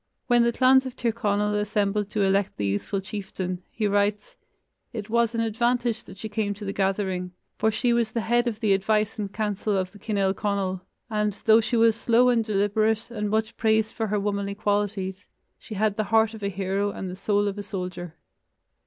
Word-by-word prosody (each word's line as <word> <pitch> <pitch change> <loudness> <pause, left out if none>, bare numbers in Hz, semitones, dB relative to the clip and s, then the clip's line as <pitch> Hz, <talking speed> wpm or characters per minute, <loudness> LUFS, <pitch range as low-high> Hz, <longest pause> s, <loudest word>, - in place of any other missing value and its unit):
When 240 -1 +4
the 235 0 +3
clans 260 +2 +4
of 255 - -8
Tir 235 -3 0
Conal 210 -1 0
assembled 210 0 0
to 210 -1 0
elect 195 0 +1
the 105 - -1
youthful 100 - -1
chieftain, 190 -3 -5
he 220 - -2
writes: 205 - 0 0.6
"It 215 -2 -6
was 235 0 +2
an 230 - +1
advantage 235 +1 0
that - - -12
she 220 - -5
came 210 -1 -2
to 205 +1 -8
the 195 - -3
gathering, 190 -2 -1 0.3
for 220 - +3
she 240 +2 +1
was 235 -2 +1
the 230 +1 -2
head 240 +2 +2
of 225 -1 -3
the 210 -3 +3
advice 215 +3 +1
and 200 -2 -3
counsel 210 -1 -1
of 185 -1 -2
the 205 - -15
Cinel 200 -3 0
Conail, 195 -3 -2 0.3
and, 210 -1 0
though 220 +1 +7
she 225 +2 0
was 225 -1 +5
slow 235 +2 +3
and 235 -2 +3
deliberate 215 +2 +1
and 210 -3 -2
much 220 +1 0
praised 220 -1 +2
for 225 - -2
her 210 0 0
womanly 200 0 -2
qualities, 205 -2 -1 0.3
she 215 - -8
had 210 +1 +1
the 215 - 0
heart 225 +1 +3
of 220 - -9
a 200 - -1
hero 195 +1 -1
and 190 - -5
the - - -6
soul 205 +1 +1
of 200 0 -3
a - - -2
soldier." 180 -4 -6
210 Hz, 205 wpm, -25 LUFS, 200-225 Hz, 0.6 s, though